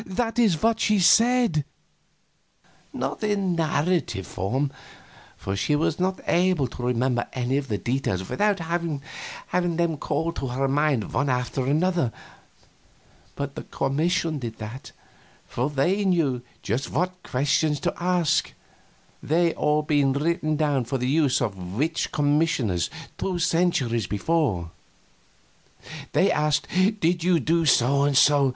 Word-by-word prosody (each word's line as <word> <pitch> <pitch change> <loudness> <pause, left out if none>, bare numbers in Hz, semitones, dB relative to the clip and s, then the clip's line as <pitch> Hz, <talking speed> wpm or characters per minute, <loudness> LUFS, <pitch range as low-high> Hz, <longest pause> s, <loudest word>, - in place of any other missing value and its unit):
That 225 +5 -2
is 195 -10 +2
what 225 0 +3
she 215 -1 +2
said 230 - +4 1.3
not - - -4
in 200 -3 0
narrative 160 - 0
form, 130 +9 -2 0.7
for 95 - -4
she 145 +9 +1
was 160 +2 0
not 185 +1 0
able 180 -5 +2
to 120 - -9
remember 125 0 0
any 130 +1 -1
of 140 -1 -3
the 105 -4 -1
details 100 -4 -2
without 205 -1 +1
having 165 -3 -2 0.5
them 170 -2 0
called 165 +3 -2
to 135 - -3
her 130 +2 -1
mind 140 -5 0
one 140 0 +1
after 125 +1 -1
the 155 +5 +2
other; 170 -10 +1 1.2
but 140 -1 -4
the - - -6
commission 160 +2 -1
did 115 -3 -6
that, 115 +5 -8 0.6
for 125 +4 -2
they 175 +9 +1
knew 160 -10 +1 0.2
just 120 +7 -2
what 180 +3 -2
questions 145 +2 0
to - - 0
ask, 175 -3 +1 0.7
they 170 +3 +2 0.4
being 140 -3 +2
all 140 - -1
written 155 -2 0
down 145 -4 +1
for 130 +4 -2
the 125 0 -2
use 145 -1 +2
of 95 -6 -4
witch 160 +5 -1
commissioners 145 - +1 0.3
two 185 -2 -1
centuries 160 - +1
before. 105 - 0 1.4
They - - +3
asked, 150 0 +1 0.3
"Did 170 0 +1
you 175 -1 +3
do 165 +3 +1
so 135 +1 +4
and 140 -1 +2
so?" 140 -1 +5
150 Hz, 140 wpm, -24 LUFS, 130-170 Hz, 1.4 s, so